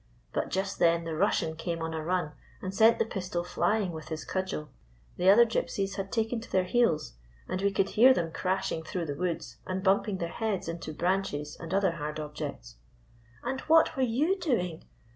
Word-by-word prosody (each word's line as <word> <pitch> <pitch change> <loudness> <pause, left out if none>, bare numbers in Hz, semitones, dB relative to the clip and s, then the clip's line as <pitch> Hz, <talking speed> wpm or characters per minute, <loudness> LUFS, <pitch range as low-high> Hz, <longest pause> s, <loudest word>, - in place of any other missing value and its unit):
But - - -1
just 195 +1 -2
then 170 0 +4
the 165 -1 -4
Russian 160 +1 +1
came 165 +1 -3
on 165 0 -3
a 160 -1 -3
run, 175 -2 0 0.3
and 185 - -5
sent 225 +3 +6
the - - +2
pistol 180 -4 -3
flying 205 +1 0
with 160 -1 -8
his 160 -1 -5
cud 190 0 -2
gel. 150 -4 -5 0.5
The 185 - +4
other 230 +4 +8
Gypsies 200 -3 -1
had 195 0 -4
taken 225 +1 0
to 225 - -12
their 185 - +3
heels, 180 - +1 0.3
and 185 - -2
we 200 0 +2
could 195 -1 +1
hear 250 +5 +7
them 170 -9 +1
crashing 185 -1 -1
through 170 +2 -4
the 145 -2 -3
woods 160 -7 -3
and 185 0 -2
bumping 195 0 +2
their 170 -2 -3
heads 215 -3 -2
into 165 -1 -5
branches 160 -3 -1
and 165 0 -7
other 195 -1 +3
hard 150 0 -4
objects." 150 - -6 0.7
"And 265 0 -2
what 320 0 +4
were 265 - -1
you 285 +11 +2
doing 180 - -1
185 Hz, 200 wpm, -29 LUFS, 165-210 Hz, 0.7 s, other